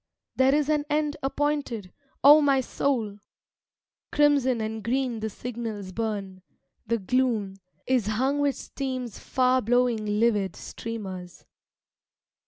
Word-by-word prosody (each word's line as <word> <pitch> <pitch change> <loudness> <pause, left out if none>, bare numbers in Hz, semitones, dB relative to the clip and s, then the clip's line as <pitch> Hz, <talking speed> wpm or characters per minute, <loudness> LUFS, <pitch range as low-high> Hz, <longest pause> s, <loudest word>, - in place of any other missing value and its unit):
There 265 +2 +4
is 295 -1 +1
an 300 -1 +2
end 300 0 0
appointed, 270 -8 -2 0.3
O 295 +3 +9
my 275 -2 +3
soul! 235 -6 -1 0.9
Crimson 280 -4 +3
and 220 0 -4
green 250 -1 -1
the 220 0 -3
signals 220 -4 -6
burn; 200 -3 -4 0.5
the 230 +1 +1
gloom 220 -2 0 0.3
Is 250 -5 +1
hung 260 +7 +1
with 285 -1 +2
steam's 255 -5 -5
far 255 0 +2
blowing 245 -1 +2 0.2
livid 210 -5 +2
streamers. 190 -6 -7
245 Hz, 115 wpm, -26 LUFS, 215-270 Hz, 0.9 s, O